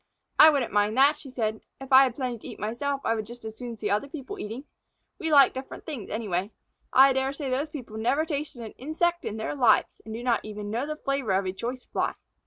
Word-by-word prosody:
"I 315 - +11
wouldn't 275 -8 0
mind 210 +2 +2
that," 285 +3 +5
she 275 - -10
said. 220 -4 -2 0.2
"If 270 0 -5
I 265 +1 +9
have 250 -3 -3
plenty 250 -4 -3
to - - -10
eat - - -9
myself, 270 +6 -2
I 225 - +3
would 215 -2 -3
just 240 0 -11
as 220 0 -6
soon 240 -1 -7
see - - -3
other 210 +7 +1
people 315 +7 -7
eating. 225 +6 -5 0.6
We 325 -4 -2
like 280 -2 +7
different 260 +1 -8
things 275 - -6
anyway. 200 -3 -2 0.4
I 270 +1 +7
dare 265 +1 0
say 275 -2 -4
those 280 +4 -1
people 245 -8 -8
never 270 +8 +1
tasted 290 -5 -4
an 220 - -7
insect 345 +5 0
in 215 - -3
their 220 - -3
lives 250 -6 +3
and 220 - -9
do 230 +2 -5
not 245 -2 +1
even 210 -1 -6
know 240 +6 -1
the 305 - -3
flavor 275 -8 -1
of 190 +1 +1
a 185 - -2
choice 245 +5 -5
Fly." - - -1
255 Hz, 240 wpm, -27 LUFS, 220-280 Hz, 0.6 s, I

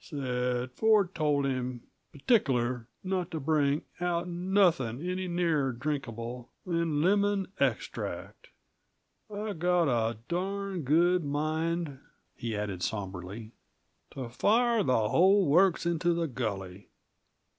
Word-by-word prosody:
Said 125 -3 -2
Ford 205 +3 +3
told 145 -3 +1
him 125 -2 -2 0.3
p'tic'ler 130 - +1 0.2
not 185 -2 -1
to 160 - -4
bring 145 0 +1 0.2
out 175 0 -1
nothin' 175 - +1
any 185 0 -2
nearer 165 -6 +1
drinkable 120 -3 -4 0.2
than 165 -4 0
lemon 200 0 +2
extract! - - -3 0.8
I've 205 -3 -4
got 175 -1 +3
a 115 -3 +1
darned 190 -1 -3
good 175 +5 +3
mind," 155 +1 -1 0.4
he 115 -4 -4
added 100 -4 -3
somberly, 100 +2 -5 0.6
"to 130 -3 -4
fire 230 - +3
the 115 - +2
hull 190 +3 +5
works 175 +4 +4
into 170 0 +1
the 170 -1 0
gully. 100 -7 -5
155 Hz, 115 wpm, -29 LUFS, 125-180 Hz, 0.8 s, hull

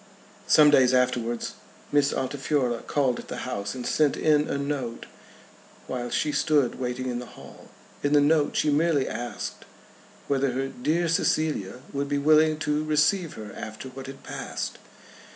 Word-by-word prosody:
Some 150 -1 +7
days 130 -3 +5
afterwards 120 -2 0 0.4
Miss 145 -1 +3
Altifiorla 130 -2 -1
called 135 -4 +1
at - - -10
the - - -5
house, 100 +4 -4
and 125 -1 -6
sent 150 -2 +2
in 150 -1 +3
a - - -1
note 140 -4 -3 0.8
while 120 -1 -4
she 150 - 0
stood 145 -4 +1
waiting 125 0 -3
in 120 -1 -2
the 125 - -8
hall. - - -13 0.3
In 145 +1 +1
the 145 - +7
note 145 +1 +3
she 150 - +2
merely 150 -2 +2
asked 120 0 -5 0.6
whether 135 -2 +1
her 135 +1 -2
"dear 160 +8 0
Cecilia" 155 -9 0
would 140 0 -2
be 145 - +1
willing 155 +2 +4
to 150 +1 +1
receive 155 +3 +2
her 105 -2 -9
after 110 +4 -7
what 135 +1 -9
had 135 0 -10
passed. - - -5
140 Hz, 160 wpm, -26 LUFS, 125-150 Hz, 0.8 s, Some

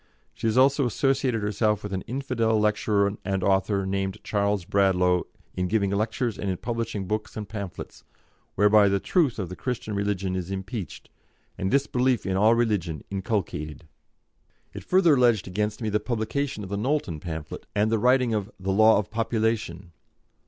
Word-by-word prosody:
She - - -3
has 110 +2 +1
also 135 +1 +4
associated 125 -1 0
herself 105 0 0
with 105 -1 -5
an 95 - -2
infidel 120 -4 0
lecturer 105 -1 +1
and 95 -2 -1
author 100 +1 +1
named 95 +1 -2
Charles 100 -2 0
Bradlaugh 90 -2 +2 0.3
in 90 0 -1
giving 100 0 +1
lectures 110 +2 -1
and 100 - -2
in 95 - -1
publishing 115 -3 -3
books 110 +3 -3
and 105 -2 -5
pamphlets, 100 -2 -7 0.5
whereby 105 0 +5
the 100 0 +1
truth 150 - +1
of 95 -4 -3
the 90 - -6
Christian 120 -3 -4
religion 100 -2 -1
is 90 -1 -4
impeached, 95 - -6 0.4
and 95 - -2
disbelief 130 -2 +1
in 95 -1 -1
all 110 +4 +5
religion 100 -10 -1
inculcated." 85 - -3 0.9
It - - -8
further 180 -4 +4
alleged 120 -7 +3
against 105 +4 -2
me 110 - 0
the 105 0 +1
publication 110 +2 -2
of 95 - -7
the 100 - -1
Knowlton 115 - -1
pamphlet, 80 -2 -7
and 105 +1 +2
the 115 - +2
writing 125 0 +3
of 105 -1 -2
the 95 +1 -2
"Law 110 +2 +6
of 105 +1 -3
Population." 110 -6 -1
105 Hz, 165 wpm, -25 LUFS, 95-115 Hz, 0.9 s, Law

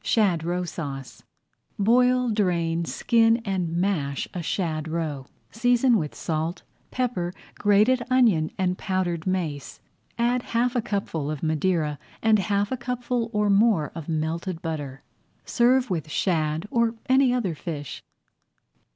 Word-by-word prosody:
SHAD 190 -8 +2
ROE 175 +2 -1
SAUCE 140 -6 -6 0.6
Boil, 250 +3 +3
drain, 170 -5 0
skin, 230 +4 +3
and 190 -4 -1
mash 170 -6 -1
a 180 - -3
shad 160 -2 -2
roe. 155 -5 -3 0.2
Season 245 +2 +3
with 155 -8 -2
salt, 160 +2 -3 0.3
pepper, 235 -9 -1 0.2
grated 210 +5 +3
onion, 220 -12 +3
and 185 -1 0
powdered 180 -3 -2
mace. 165 -7 -3 0.4
Add 240 +1 +1
half 245 +1 0
a 245 - +2
cupful 180 -9 -3
of 155 -1 -4
Madeira 155 -1 0 0.2
and 220 -1 +4
half 200 +3 0
a 260 - -1
cupful 245 -1 -2
or 210 -1 +1
more 200 -8 +3
of 165 -1 -7
melted 165 +2 -2
butter. 145 -5 -5 0.4
Serve 250 -1 +3
with 160 -3 -2
shad 160 +1 0
or 235 -1 +2
any 260 0 +4
other 235 -9 0
fish. 150 -3 -6
185 Hz, 135 wpm, -25 LUFS, 160-230 Hz, 0.6 s, and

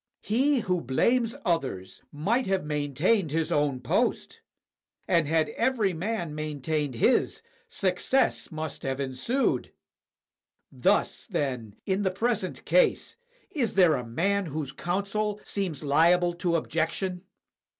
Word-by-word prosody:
He 260 +5 +2
who 180 -4 0
blames 230 - +1
others 130 - -2
might 215 - 0
have 190 -3 0
maintained 150 - +1
his 160 +2 -1
own 145 -3 +1
post; 125 - -1 0.7
and 165 -3 +3
had 160 0 +2
every 230 -6 +1
man 175 -2 -3
maintained 150 -2 -2
his, 250 - +2 0.2
success 200 - +1
must 155 -1 -5
have 135 0 -3
ensued. 140 - 0 1.0
Thus, - - +1
then, 125 -7 -3
in 190 +1 0
the 190 - +2
present 195 0 -2
case, - - +2 0.4
is 250 - -1
there 180 -4 +6
a 125 -4 -1
man 185 +11 0
whose 150 -2 -4
counsel 200 +7 -2
seems 180 -9 -3
liable 170 +5 +4
to 175 0 -1
objection? 170 +3 -1
170 Hz, 120 wpm, -27 LUFS, 145-200 Hz, 1.0 s, there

